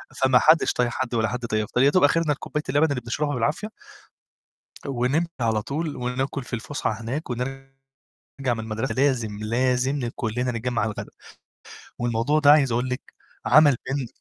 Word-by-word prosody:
فما 130 -1 +4
حدّش 160 +4 +4
طايق 125 -1 +1
حد 125 0 -3
ولا 110 -1 +2
حد 125 +1 -4
طايق 110 -2 0
يفطر 125 - -1
يا 135 - +6
دوب 185 +5 +3
آخِرنا 155 +1 +3
الكوباية 150 +1 -4
اللبن 145 +4 +3
اللي 130 -3 -2
بنشربها 145 +5 -2
بالعافية، 145 - -1 1.2
ونمشي 135 +5 0
على 110 -2 +1
طول 150 +4 -3
وناكُل 125 +2 -3
في - - -14
الفُسحة 130 +6 -3
هناك 130 +6 -4
ونرجَع 135 +2 -4 0.9
من 115 - -5
المدرسة 110 +4 -3
لازم، 125 -6 +1
لازم 125 +5 0
ل 120 -3 -2
كلّنا 125 +2 -2
نجمّع 120 0 -2
على 110 +1 0
الغدا، - - -7 0.9
والموضوع 120 +5 +1
ده 145 -1 +6
عايز 140 -5 +4
أقول 120 +2 0
لِك 125 0 -3 0.4
عمل 145 0 +6
بين 135 -1 -2
125 Hz, 170 wpm, -24 LUFS, 120-145 Hz, 1.2 s, يا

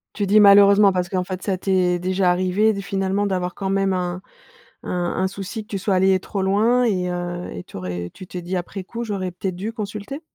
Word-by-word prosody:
Tu 205 -1 -1
dis, 210 +2 +6
malheureusement, 200 0 +7
parce 180 -1 -1
qu'en 185 0 -1
fait, 185 0 -6
ça 190 -3 -1
t'es 185 -2 +1
déjà 185 +1 +1
arrivé 185 +4 +2
d 200 - -4
finalement, 195 +1 -1
d'avoir 180 -2 -2
quand 195 -1 -3
même 195 0 +1
un 180 0 -2 0.6
un - - -7 0.3
un 190 - +2
souci 200 +3 -6
que 210 - -21
tu 200 - -3
sois 195 0 0
allé 190 0 +4
trop 195 +1 -4
loin 215 +6 +3
et 185 -6 0
heu 175 0 -4
et 90 - -7
tu - - -13
aurais 90 -1 -5
tu 185 - -11
t'es 180 0 -7
dit, 180 +2 -3
après 185 +2 -5
coup: 235 +5 -6
«J'aurais 195 -4 -3
peut-être 180 +1 -4
dû 205 +5 -5
consulter?» 215 +5 -6
190 Hz, 225 wpm, -22 LUFS, 180-200 Hz, 0.6 s, malheureusement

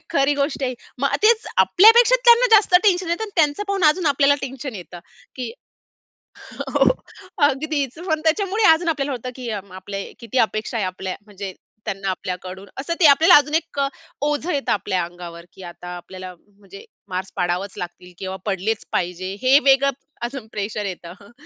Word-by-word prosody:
खरी 280 +1 +2
गोष्ट 280 0 -2
आहे, 255 -1 -2 0.2
मग 275 +1 0
तेच 450 +1 +4 0.2
आपल्यापेक्षा 470 +5 +6
त्यांना 475 +1 +7
जास्त 400 -3 +2
टेन्शन 365 -3 +3
येतं 345 +6 -1
आणि 420 - -9
त्यांचं 305 +5 +2
पाहून 390 -4 0
अजून 315 +2 +3
आपल्याला 285 0 +4
टेन्शन 265 -1 -6
येतं 180 -2 -9 0.4
की 250 -3 -4 1.2
हो, - - +3 0.6
अगदीच. 285 -1 -2
पण 315 -1 +1
त्याच्यामुळे 395 +6 +1
अजून 335 +2 0
आपल्याला 290 -3 -1
होतं 250 0 -5
की 250 -2 -7
आपले 195 +1 -7 0.2
किती 235 +2 -3
अपेक्षा 215 +2 -4
आहे 205 -4 0
आपल्या 185 0 -5
म्हणजे 200 -2 -8 0.3
त्यांना 195 0 -4
आपल्याकडून. 185 +1 -6
असं 335 +5 -3
ते 320 - +7
आपल्याला 325 +6 +6
अजून 295 +1 +2
एक 320 -3 -1
अ, 275 - +2 0.3
ओझं 295 +3 -1
येतं 280 -1 -1
आपल्या 185 -4 -1
अंगावर 170 -1 -10
की 190 - -14
आता 180 0 -9
आपल्याला 185 +1 -9
म्हणजे 200 0 -16 0.2
मार्क्स 185 +1 -5
पाडावंच 180 +3 -2
लागतील 180 +1 -8
किंवा 190 0 -5
पडलेच 200 +3 -1
पाहिजे 180 +2 -2
हे 265 +2 +6
वेगळं 275 +1 +4 0.4
अजून 255 -4 -8
प्रेशर 210 0 -3
येतं 175 -2 -7
हं. 200 - -16
255 Hz, 170 wpm, -21 LUFS, 190-305 Hz, 1.2 s, त्यांना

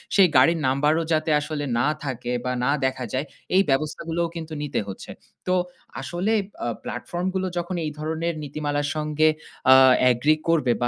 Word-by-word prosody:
সেই 195 -2 +7
গাড়ির 165 -1 +5
নাম্বারও 150 +5 +2
যাতে 155 0 +1
আসলে 150 0 -4 0.2
না 125 - +2 0.2
থাকে 125 -3 -4
বা 125 - 0
না 140 - +2
দেখা 130 -1 -1
যায় 130 +3 -1 0.3
এই 190 - +7
ব্যবস্থাগুলোও 165 +4 0
কিন্তু 160 -1 -6
নিতে 145 -1 -1
হচ্ছে। 95 - -8 0.4
তো 185 - +2 0.5
আসলে 175 +11 -1 0.3
আ - - -1 0.2
প্লাটফর্ম 175 +9 -4
গুলো 190 0 0
যখন 175 +2 -2
এই 150 - -2
ধরনের 160 +2 -2
নীতিমালার 145 0 -2
সঙ্গে 155 0 +1 0.4
আ - - +10 0.4
এগ্রি 145 +6 +3
করবে 155 -7 +3
বা 120 - +2
155 Hz, 165 wpm, -24 LUFS, 135-165 Hz, 0.5 s, আ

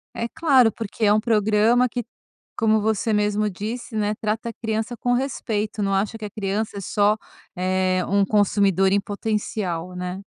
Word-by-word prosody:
É 230 - -2
claro, 265 -8 +4
porque 225 0 -6
é 205 - +5
um 210 - +4
programa 220 +2 +3
que 240 -1 -4 0.5
como 220 -1 +3
você 220 +1 0
mesmo 210 0 +1
disse, 220 +5 -6
né, 210 0 0
trata 220 +2 -2
a 230 - -7
criança 225 +2 -3
com 245 +2 0
respeito, 220 -5 -2
não 195 - 0
acha 205 +3 -1
que 215 - -5
a - - -5
criança 205 +1 -3
é 200 - -4
só, 205 +3 +2 0.4
eh, 185 0 +1
um 200 0 +3
consumidor 195 -2 +2
em 200 0 +3
potencial, 200 -4 -3
né. 180 +2 -5
210 Hz, 175 wpm, -23 LUFS, 200-225 Hz, 0.5 s, é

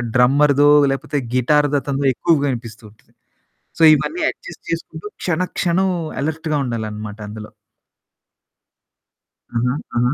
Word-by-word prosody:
డ్రమ్మర్‌దో 140 +3 +4 0.2
లేకపోతే 140 +2 -2 0.2
గిటార్‌దతనదో 140 +1 +1
ఎక్కువగా 145 +3 +1
వినిపిస్తుంటది. 110 -3 -10 0.7
సో, - - +4
ఇవన్నీ 320 - -3
అడ్జస్ట్ 175 - -13
చేసుకుంటూ 165 +2 -5 0.2
క్షణ 175 -1 0 0.2
క్షణం 185 +2 +1 0.3
అలర్ట్‌గా 155 0 -2
ఉండాలనమాట 110 -3 -5
అందులో. 105 0 -9 2.0
ఆహా! 125 +2 +1 0.2
ఆహా! 125 +3 +2
140 Hz, 95 wpm, -19 LUFS, 120-155 Hz, 2.0 s, డ్రమ్మర్‌దో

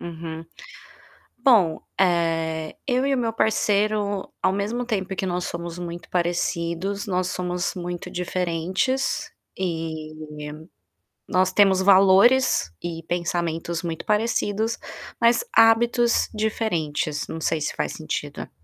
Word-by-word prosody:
Uhum. 165 -1 -7 0.9
Bom, 220 -11 +4 0.2
eh, 165 -3 +1
eu 255 0 +1
e 275 - +2
o - - 0
meu 230 -2 0
parceiro, 210 -2 +1
ao 185 - +3
mesmo 210 +5 -2
tempo 195 -5 -2
que 190 - -1
nós 180 -1 -1
somos 170 0 -5
muito 175 -1 -7
parecidos, 175 +3 -1
nós 185 -2 0
somos 180 0 -2
muito 175 -1 -5
diferentes. 180 +7 -1 0.3
E 160 -4 -3 1.2
nós 185 0 +2
temos 195 -2 +5
valores 195 - +5
e 165 -1 -5
pensamentos 170 -1 -2
muito 165 -2 -4
parecidos, 220 +1 0 0.4
mas 235 0 +4
hábitos 235 +1 +4
diferentes, 165 -9 -1
não 160 - -5
sei 160 0 0
se 150 - -3
faz 75 -1 -1
sentido. - - -5
185 Hz, 115 wpm, -24 LUFS, 170-215 Hz, 1.2 s, temos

